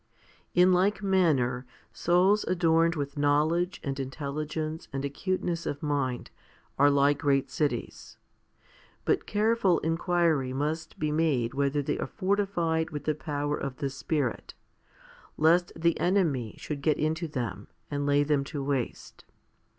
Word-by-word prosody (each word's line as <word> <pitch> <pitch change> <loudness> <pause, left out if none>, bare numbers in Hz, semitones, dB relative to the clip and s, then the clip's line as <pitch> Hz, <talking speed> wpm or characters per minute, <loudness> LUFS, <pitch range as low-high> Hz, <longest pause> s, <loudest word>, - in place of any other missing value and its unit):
In 180 +1 +6
like 200 +3 +2
manner, 135 -10 +2 0.3
souls 185 +5 +3
adorned 165 -1 +2
with 145 0 -4
knowledge 155 +5 +2
and 135 -1 -3
intelligence 150 +3 -4
and 135 +1 -3
acuteness 170 +3 -2
of 145 +2 -4
mind 140 -4 -1 0.5
are 145 +1 +6
like 140 0 +3
great 135 -2 +1
cities. 145 -6 -3 0.9
But - - +1
careful 210 -4 +2
inquiry 165 -5 +1
must 155 +4 -3
be 150 0 -1
made 150 -7 +1
whether 140 +1 0
they - - -2
are - - -2
fortified 185 -5 0
with 150 -2 -6
the 155 - +1
power 145 -1 -2
of 140 -3 -5
the 140 -1 -2
Spirit, 135 -2 -2 0.8
lest 170 +3 +4
the 170 0 +1
enemy 160 - +1
should 145 -2 -5
get 150 +1 +2
into 160 +2 -1
them 125 -6 -4 0.2
and 145 0 -1
lay 145 0 +4
them 145 -1 +1
waste. 135 -3 -3
150 Hz, 135 wpm, -28 LUFS, 140-170 Hz, 0.9 s, In